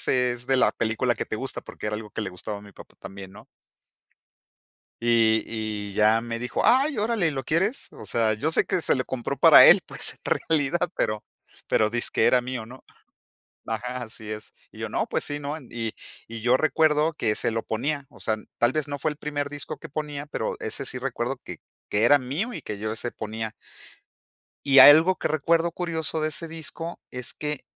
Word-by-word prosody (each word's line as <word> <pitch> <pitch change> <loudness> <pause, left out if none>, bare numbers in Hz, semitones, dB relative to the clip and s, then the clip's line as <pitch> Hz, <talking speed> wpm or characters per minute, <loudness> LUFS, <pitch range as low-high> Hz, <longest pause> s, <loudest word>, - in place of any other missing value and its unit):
ese 125 -1 +2
es 120 +1 -9
de 135 - +4
la - - +3
película 115 +2 0
que - - -4
te - - -4
gusta", 130 +4 -3
porque - - -9
era 105 - -2
algo 105 0 -7
que 110 - -4
le 105 - -3
gustaba 100 +3 -6
a - - -12
mi 100 0 -14
papá - - -15
también, 95 -1 -9
¿no? 100 +2 -14 1.5
Y 115 -2 +3
y, 110 -2 -4
ya 110 +2 +4
me 115 0 -5
dijo: 125 +1 -2
"¡Ay, 270 +1 +3
órale! 210 -6 +1
¿Lo 135 -2 -4
quieres?". 190 - 0
O - - -11
sea, 110 -2 +1
yo 140 +9 -1
sé - - +4
que 185 -2 0
se - - +4
lo 130 - -1
compró 125 -3 -4
para - - +9
él, - - +8
pues, - - +2
en - - -29 0.3
realidad, 160 +1 +1
pero 105 0 -1 0.4
pero 110 - +3
dizque 120 +1 +1
era 125 - +5
mío, 125 -2 -5
¿no? 125 +3 -13 0.8
ajá, 125 +2 -3
así 110 -1 -9
es. 110 0 -7 0.2
Y - - -16
yo - - -4
no, - - -1
pues - - -1
sí, 145 0 -3
¿no? 145 +2 -4
En 135 -6 -13
y 115 -2 -3 0.4
y 115 0 -7
yo 125 +3 +3
recuerdo 155 +1 +2
que 110 -7 0
se - - 0
lo 115 0 -2
ponía. 140 +5 -3
O - - -18
sea, 110 - 0 0.2
tal 120 +1 +3
vez 155 0 -1
no 145 0 -4
fue 155 - 0
el 150 - -7
primer 145 -1 -3
disco 145 0 -5
que - - -10
ponía, 145 0 -5
pero 110 -6 -3
ese 135 +5 -4
sí 125 - -3
recuerdo 125 0 -3
que - - -8 0.3
que 105 - +1
era 145 +4 +6
mío 145 - -3
y - - -7
que 105 - -6
yo 110 +1 -3
ese 120 +2 -4
ponía. 110 0 -5 1.1
Y 140 -1 +6
algo 160 +7 +9
que - - -2
recuerdo 165 +2 +1
curioso 160 -2 -2
de 155 - +1
ese 165 +2 -2
disco 165 +1 -5
es 125 -2 -3
que 150 -2 -3
125 Hz, 215 wpm, -25 LUFS, 110-155 Hz, 1.5 s, para